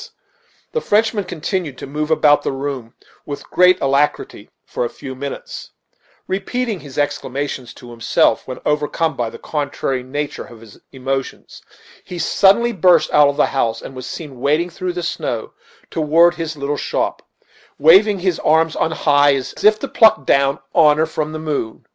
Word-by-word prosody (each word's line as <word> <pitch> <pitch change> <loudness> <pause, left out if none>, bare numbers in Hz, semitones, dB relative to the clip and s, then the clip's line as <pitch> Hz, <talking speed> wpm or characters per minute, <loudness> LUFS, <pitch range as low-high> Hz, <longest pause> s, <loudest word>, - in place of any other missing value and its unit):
The 470 - -1
Frenchman 215 - +1
continued 175 -4 -4
to - - -7
move 150 +2 -4
about 150 -2 +4
the - - -2
room 135 -4 -5 0.3
with 145 -1 -7
great 180 0 +5
alacrity 140 +2 -1 0.2
for - - -3
a 120 - -2
few 135 -2 -9
minutes, 140 +2 -7 0.5
repeating 210 +3 -3
his 140 -4 -12
exclamations 140 -3 -3
to 120 -1 -12
himself; 115 -1 +1
when 130 - -6
overcome 150 +1 0
by 120 -3 -2
the - - -10
contrary 140 -3 -3
nature 145 +3 -5
of 120 - -14
his 110 -3 -15
emotions, 135 0 -5 0.4
he 180 - -8
suddenly 200 +7 +3
burst 180 -3 +3
out 150 -1 +6
of 140 - -1
the - - +4
house, 115 -4 -1
and 135 - -10
was 130 - -7
seen 145 -6 -8
wading 150 +6 +1
through 180 +1 -4
the 175 0 -4
snow 145 -9 -4 0.4
toward 165 +2 +4
his 160 -2 -5
little 140 +1 -2
shop, - - -2 0.6
waving 195 +6 +5
his 180 -2 0
arms 160 +1 +2
on - - 0
high, 145 -3 +3
as 135 -1 -4
if 215 0 +6
to 275 - -5
pluck 220 - +4
down 140 +1 +2 0.2
honor 155 -1 +4
from 155 -1 -4
the 155 - -5
moon. 150 -8 -4
150 Hz, 165 wpm, -18 LUFS, 135-170 Hz, 0.6 s, out